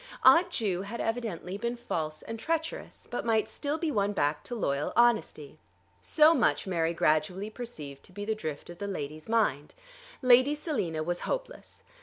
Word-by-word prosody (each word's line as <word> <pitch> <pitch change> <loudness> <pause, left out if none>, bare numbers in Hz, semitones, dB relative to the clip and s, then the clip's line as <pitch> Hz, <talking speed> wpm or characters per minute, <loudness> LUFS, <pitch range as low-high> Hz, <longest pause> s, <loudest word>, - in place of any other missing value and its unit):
Aunt 350 +2 +7
Ju 200 - -1
had 205 +4 -6
evidently 210 -5 -3
been 235 +2 -2
false 160 -10 -4
and 225 0 -6
treacherous, 325 +4 -3
but 245 - -2
might 225 -2 +2
still 290 +1 -3
be 320 -1 -1
won 205 -4 +1
back 145 -4 0
to 245 - -5
loyal 140 -9 -1
honesty. 220 -11 +2 0.4
So 310 +1 +5
much - - +2
Mary 170 -3 0
gradually 175 +7 +1
perceived 155 - -8
to - - -17
be 205 +3 -6
the 220 - 0
drift 160 -6 -6
of 175 - -12
the 200 - -3
lady's 155 -2 -5
mind. 180 -11 +1 0.5
Lady 255 +3 +6
Selina 185 - -2
was 175 +2 -2
hopeless. - - -5
205 Hz, 170 wpm, -29 LUFS, 160-245 Hz, 0.5 s, Aunt